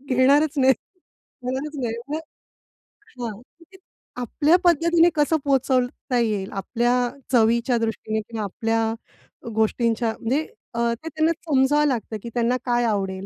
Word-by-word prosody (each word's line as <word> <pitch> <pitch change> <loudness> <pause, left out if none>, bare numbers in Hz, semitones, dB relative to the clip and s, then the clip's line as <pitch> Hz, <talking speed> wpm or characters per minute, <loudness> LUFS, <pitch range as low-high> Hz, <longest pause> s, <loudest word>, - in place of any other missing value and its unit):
घेणारच 285 +4 +4
नाही, 265 0 +5 0.7
घेणारच 265 +4 -3
नाही. 230 -2 -1 0.2
हां. 250 - -10 0.8
आपल्या 295 +7 +2
पद्धतीने 340 0 +4
कसं 305 +1 +2
पोहचवता 255 -2 +1
येईल. 210 -4 -1
आपल्या 235 +5 0 0.4
चवीच्या 235 +1 +3
दृष्टीने 220 -1 -2
किंवा 220 0 -6
आपल्या 225 +3 -1 0.6
अ, - - -10
गोष्टींच्या 225 +1 +1
म्हणजे 255 +6 0 0.3
अ, 235 - -3
ते 280 +8 -9
त्यांना 315 +2 +1 0.2
समजावं 295 +1 +3
लागतं, 230 -4 -2
की 235 - -5
त्यांना 240 +1 +2
काय 240 -1 +1
आवडेल. 195 -3 -1
245 Hz, 120 wpm, -23 LUFS, 225-290 Hz, 0.8 s, नाही